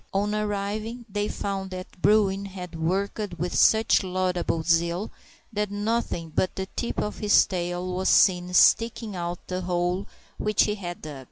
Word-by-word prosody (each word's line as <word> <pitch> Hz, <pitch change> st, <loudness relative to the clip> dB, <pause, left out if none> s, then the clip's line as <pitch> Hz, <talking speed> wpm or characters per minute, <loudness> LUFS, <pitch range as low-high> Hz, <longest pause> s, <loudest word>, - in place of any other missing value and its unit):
On 205 Hz, +2 st, +1 dB
arriving, 210 Hz, +3 st, -3 dB
they 205 Hz, 0 st, -2 dB
found 195 Hz, -2 st, -3 dB
that 185 Hz, -1 st, -9 dB
Bruin 200 Hz, -2 st, +3 dB
had 185 Hz, -3 st, -8 dB
worked 190 Hz, +3 st, -2 dB
with 175 Hz, +1 st, -2 dB
such 220 Hz, 0 st, +4 dB
laudable 180 Hz, -3 st, -1 dB
zeal 170 Hz, +4 st, +1 dB, 0.4 s
that 210 Hz, -1 st, -1 dB
nothing 205 Hz, -5 st, -2 dB
but 185 Hz, -, 0 dB
the 190 Hz, -, -3 dB
tip 235 Hz, -, -3 dB
of 210 Hz, -, -3 dB
his 210 Hz, -1 st, +5 dB
tail 180 Hz, -1 st, -3 dB
was 185 Hz, +1 st, 0 dB
seen 180 Hz, -2 st, +4 dB
sticking 230 Hz, +1 st, +4 dB
out 175 Hz, 0 st, -3 dB
of -, -, -37 dB
the 185 Hz, 0 st, -3 dB
hole 180 Hz, +1 st, -1 dB, 0.3 s
which 210 Hz, -1 st, +3 dB
he 210 Hz, -, 0 dB
had 175 Hz, -4 st, -7 dB
dug. 150 Hz, -3 st, -7 dB
190 Hz, 165 wpm, -26 LUFS, 175-210 Hz, 0.4 s, his